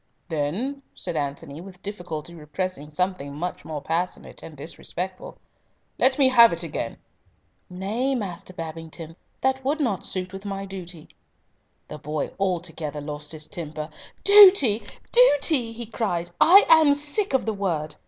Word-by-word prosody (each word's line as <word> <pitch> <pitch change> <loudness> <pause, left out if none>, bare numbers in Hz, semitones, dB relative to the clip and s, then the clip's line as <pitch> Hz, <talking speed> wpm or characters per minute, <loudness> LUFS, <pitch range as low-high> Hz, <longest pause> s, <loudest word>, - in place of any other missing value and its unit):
"Then," 180 - -2
said 175 -2 -5
Antony, 145 +1 -4
with 185 0 -13
difficulty 175 -5 -6
repressing 155 0 -5
something 150 -4 -3
much 175 +4 -5
more 150 -3 -6
passionate 175 +3 -3
and 155 -3 -11
disrespectful, 180 +5 -7 0.6
"let 260 0 +4
me 275 -2 +5
have 235 -2 +7
it 170 +1 -3
again." 145 -7 -5 0.7
"Nay, 215 +9 -2
Master 195 -5 -6
Babington, 165 -1 -8 0.3
that 265 0 0
would 290 +4 -1
not 230 -10 -1
suit 185 0 -4
with 195 0 -8
my 195 -1 -5
duty." 180 -4 -9 0.8
The 150 - -9
boy 150 0 -4
altogether 165 -5 -3
lost 150 0 -6
his 155 -1 -6
temper. 155 -2 -6 0.3
"Duty! 380 - +8 0.3
duty!" 290 - +5
he 235 +1 -5
cried. 190 -6 -3
"I 390 +5 +8
am 315 -3 +6
sick 295 +4 0
of 265 - +1
the 220 - -1
word. 165 -7 -2
180 Hz, 145 wpm, -24 LUFS, 155-235 Hz, 0.8 s, Duty